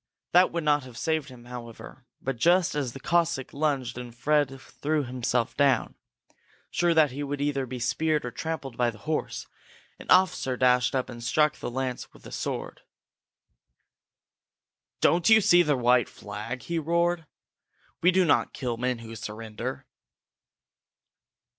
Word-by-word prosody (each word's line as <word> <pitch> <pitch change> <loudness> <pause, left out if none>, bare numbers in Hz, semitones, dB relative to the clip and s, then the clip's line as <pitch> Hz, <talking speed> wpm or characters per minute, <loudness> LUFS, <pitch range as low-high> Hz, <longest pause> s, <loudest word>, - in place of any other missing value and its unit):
That 180 +1 +5
would 170 -1 -2
not 150 -1 +3
have 125 -2 -12
saved 160 -3 -1
him, 120 -2 -13
however, 120 +1 -10 0.2
but 135 - -1
just 175 +7 +3
as 140 -5 -2
the - - -8
Cossack 170 -3 0
lunged 140 -5 -1
and 120 -1 -9
Fred 145 -1 +1
threw 150 +2 -2
himself 125 -1 -1
down, 140 -2 +2 0.8
sure 175 -1 +2
that 155 -4 +5
he 140 +3 -5
would 145 0 -3
either 140 -2 -1
be 125 +1 -5
speared 150 +5 0
or 125 - -4
trampled 140 -1 -5
by 120 -1 +2
the 110 - -8
horse, 155 +8 -3 0.5
an - - -11
officer 180 -9 +3
dashed 125 0 +3
up 130 - 0
and 120 -1 -9
struck 150 +5 +3
up - - -19
the - - -4
lance 130 0 -4
with - - -17
his - - -9
sword. - - -4 2.2
"Don't 170 +3 +4
you 220 0 +8
see 175 -4 +5
the 150 -5 +2
white 125 -1 +3
flag?" 105 +5 -7
he 170 -1 -2
roared. 170 +1 0 0.7
"We 180 - +5
do 185 0 +4
not 150 - +2
kill 120 -3 -3
men 125 +1 -1
who 115 0 -8
surrender!" 110 +3 -6
135 Hz, 160 wpm, -27 LUFS, 125-160 Hz, 2.2 s, you